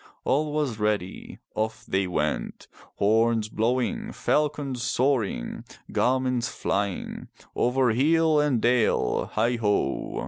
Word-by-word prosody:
All 150 +3 +1
was 145 -7 -1
ready. 105 -3 -2 0.2
Off 110 +1 -3
they 95 -1 0
went. 75 -7 -2 0.3
Horns 110 +1 +2
blowing, 130 - -1
falcons 145 -4 0
soaring, 120 - 0 0.3
garments 125 -2 +1
flying! 100 -3 -3 0.3
Over 125 0 +2
hill 155 +5 +3
and 145 -5 +2
dale, 120 0 +1
heigho! 110 - 0
120 Hz, 100 wpm, -26 LUFS, 105-135 Hz, 0.3 s, hill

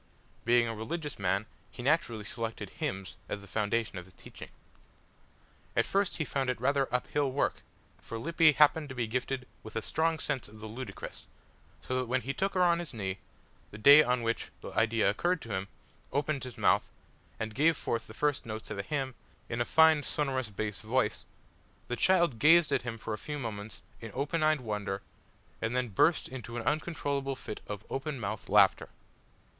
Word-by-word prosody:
Being 120 0 +4
a 115 - -2
religious 145 +6 -4
man 100 +2 +1 0.2
he 120 - -9
naturally 125 -7 +1
selected 110 -2 -5
hymns 95 0 -4
as - - -3
the - - -12
foundation 105 0 -1
of 90 - -10
his 95 - -20
teaching. - - -11 1.3
At - - +3
first 195 -1 +1
he 155 - -1
found 135 -2 -1
it 125 - -1
rather 135 +1 +1
up 125 0 +1
hill 145 -2 0
work, 140 - 0 0.4
for 115 - -7
Lippy 160 +4 +4
happened 150 +1 +4
to 130 - -7
be 120 -2 0
gifted 125 +3 -2
with 110 0 -11
a 115 - 0
strong 160 +5 +1
sense 140 -5 -2
of 110 +1 -14
the 110 - -8
ludicrous, 120 +4 -7 0.6
so 130 0 -1
that 130 - -2
when 130 +2 +1
he 135 +2 -3
took 195 +6 -1
her 185 - +4
on 170 -1 +4
his 170 -7 -6
knee 95 -3 -3 0.5
the 105 - -10
day 140 +8 +9
on 125 -4 +1
which 115 0 -1
the - - -7
idea 110 0 +2
occurred 175 - +1
to 115 - -5
him 95 +1 -2 0.4
opened 145 -1 -1
his 125 - -8
mouth, - - +3 0.5
and 110 0 -3
gave 155 +5 +3
forth 115 -1 -2
the 110 - -11
first 145 0 +1
notes 110 -1 -6
of - - -4
a - - +2
hymn 135 +4 -2 0.4
in 120 0 -1
a - - +2
fine 160 +1 +6
sonorous 135 -5 -1
bass 105 -1 -4
voice, 115 +6 0 0.6
the 120 - 0
child 170 -5 +3
gazed 165 +3 +6
at - - +2
him 120 -2 -5
for 110 0 -4
a 105 - -4
few 150 -1 -5
moments 110 -5 -6 0.2
in 115 - -7
open 145 +5 -1
eyed 155 -2 +3
wonder, 105 -3 -3 0.6
and 115 +2 -1
then 125 -1 0
burst 155 - +3
into 120 -2 -7
an 115 - -3
uncontrollable 140 -1 -1
fit 110 - -7
of 105 0 -6
open 135 0 -3
mouthed 105 -1 -4
laughter. 100 -1 +5
125 Hz, 195 wpm, -31 LUFS, 110-145 Hz, 1.3 s, day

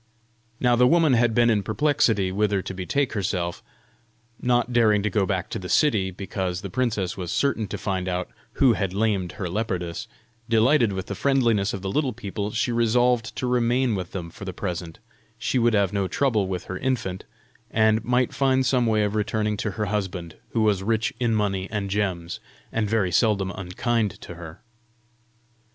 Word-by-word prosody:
Now 125 -1 +3
the 125 +1 +5
woman 160 -1 +4
had 120 -2 +3
been 120 -1 +5
in 105 -2 +2
perplexity 110 -4 +1
whither 100 -1 +1
to - - -5
betake 125 +9 -1
herself, 90 -4 -2 0.8
not 120 0 +1
daring 110 -4 +4
to 105 - 0
go 95 -1 +1
back 95 -1 -1
to 115 - -3
the 90 -1 -7
city, 110 -11 +3
because 95 -1 -4
the 100 - -6
princess 105 -6 -1
was 90 -2 -4
certain 120 -5 0
to - - -5
find 95 -2 -2
out 90 0 -2 0.3
who 130 -4 +4
had 95 -3 -2
lamed 100 -5 0
her 95 - -4
leopardess: 90 -3 -3 0.4
delighted 115 +1 +4
with 95 -1 -4
the - - -5
friendliness 120 -8 +2
of 100 - -6
the 95 - -2
little 140 -2 0
people, 105 -2 -4
she 115 +2 -1
resolved 120 0 +2
to 130 - -3
remain 125 0 +2
with 90 -3 -4
them 85 -4 -6
for 100 - -11
the 95 -1 -5
present: 90 -3 -5 0.4
she 115 +3 0
would 120 -1 +3
have 100 -1 +2
no 100 -2 0
trouble 110 -1 +1
with 90 -2 -3
her 95 0 -6
infant, 120 -8 -2 0.5
and 110 -1 +3
might 125 +1 +1
find 130 -1 +2
some 125 -2 +2
way 110 -1 +2
of 105 0 -1
returning 105 0 0
to 105 - -2
her 105 +1 -2
husband, 95 -5 -3 0.2
who 115 - +2
was 105 -3 +2
rich 110 +3 0
in 120 -3 +1
money 100 -3 -1
and 100 -2 -3
gems, 95 -4 -2 0.3
and 110 -2 -1
very 105 -5 +1
seldom 100 -1 +2
unkind 100 +4 -2
to - - -9
her. 85 0 -10
105 Hz, 185 wpm, -24 LUFS, 95-120 Hz, 0.8 s, the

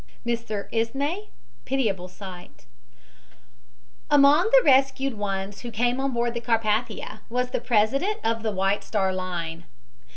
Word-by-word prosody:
MR. 230 -4 -2
ISMY 280 - -1 0.4
"PITIABLE 215 -9 -1
SIGHT" 180 -1 -11 1.4
Among 290 +7 +6
the - - +6
rescued 270 0 +3
ones 195 -1 -4
who 240 - -6
came 240 +3 0
on 270 0 0
board 235 0 0
the 235 - -3
Carpathia 220 -1 -1
was 250 +1 -1
the - - -1
president 270 - +1
of 225 0 0
the 220 -1 -1
White 195 +1 0
Star 190 -3 0
Line. 170 -3 -4
230 Hz, 130 wpm, -25 LUFS, 200-265 Hz, 1.4 s, Among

